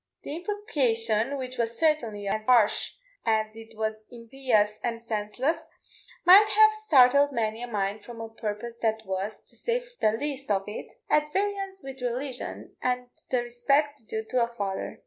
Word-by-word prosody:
The 290 - -5
imprecation, 275 - 0
which 255 -1 -6
was 230 0 -1
certainly 235 -11 +1
as 215 +2 -1
harsh 235 -5 +4 0.3
as 220 -1 +1
it 225 0 -12
was 220 0 -2
impious 230 -3 0
and 230 -1 -2
senseless, 230 +7 -2 0.6
might 400 +4 +9
have 430 +1 +6
startled 285 -9 +5
many 225 -2 -1
a 245 - -4
mind 205 -2 -2
from 235 -1 -10
a 225 - -5
purpose 225 +1 -5
that 220 -1 0
was, 195 +3 -4
to - - -9
say 485 +1 -1 0.2
the 215 - +4
least 275 +2 -4
of 195 -2 +2
it, 210 - -7 0.2
at 300 0 +2
variance 390 0 -2
with 270 -1 -8
religion 250 +1 -4
and 250 0 -1 0.2
the 250 -2 +1
respect 275 +2 0
due 220 0 -3
to 255 -1 +2
a - - 0
father. 200 -5 -4
240 Hz, 165 wpm, -27 LUFS, 220-285 Hz, 0.6 s, might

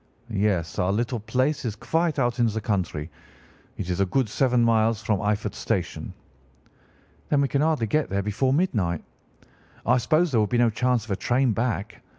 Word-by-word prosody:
"'Yes, 100 -5 0
our 90 +1 +2
little 120 +3 -1
place 130 +7 0
is 115 -4 -3
quite 165 +7 0
out 120 -2 0
in 120 - +4
the 110 0 -2
country. 90 -7 -2 0.7
It 95 - -4
is 90 - -2
a 100 - +3
good 130 +4 +1
seven 125 +1 +2
miles 110 -1 +2
from 100 -1 +1
Eyford 105 +1 -1
Station.' - - -3 1.2
"'Then 145 - +3
we 140 - +2
can 140 +1 0
hardly 155 -6 +2
get 150 +8 0
there 100 +1 -1
before 110 +6 0
midnight. 110 - 0 0.8
I 125 +2 +4
suppose 155 +7 +2
there 115 -4 +3
would 105 - 0
be 120 - +1
no 120 -1 +4
chance 125 0 0
of 110 - -8
a - - +2
train 125 +5 +1
back. 110 -2 -2
115 Hz, 185 wpm, -25 LUFS, 100-130 Hz, 1.2 s, in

